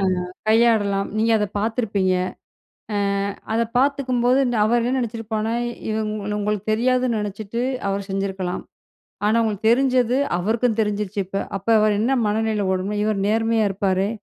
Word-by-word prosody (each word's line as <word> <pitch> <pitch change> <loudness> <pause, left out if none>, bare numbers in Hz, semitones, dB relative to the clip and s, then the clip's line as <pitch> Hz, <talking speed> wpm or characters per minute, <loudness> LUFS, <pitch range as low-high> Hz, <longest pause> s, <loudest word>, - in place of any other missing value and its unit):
அ, - - -1 0.5
கையாடலாம் 215 -3 +3
நீங்க 225 +1 +3
அத 210 - 0
பாத்துருப்பீங்க. 205 -4 0 0.8
அ, - - 0 0.6
அத 230 - +2 0.2
பாத்துக்கும்போது, 255 -2 +2
இந்த 245 -2 -1
அவர் 235 +2 +2
என்ன 250 - 0
நெனச்சிருப்பானா 225 -1 -3 0.4
இவன் 215 -1 -2
உங்களுக்கு 210 0 -2
தெரியாதுன்னு 250 0 +1
நினச்சுட்டு, 210 +3 -4 0.3
அவர் 200 0 -3
செஞ்சுருக்கலாம். 195 -2 -2 0.6
ஆனா, 220 +2 +3
உங்களுக்கு 220 0 0
தெரிஞ்சது 255 0 +3 0.2
அவருக்கும் 225 +4 0
தெரிஞ்சிருச்சு 210 -1 -2
இப்ப, 195 +1 -3
அப்ப 195 - -14
அவர் 210 -1 +2
என்ன 260 +5 +2
மனநிலை 215 -1 0
ஓடும்னா, 195 +3 -2
"இவரு 215 -2 0
நேர்மையா 225 0 +2
இருப்பாரே, 195 0 0
215 Hz, 135 wpm, -22 LUFS, 200-235 Hz, 0.8 s, கையாடலாம்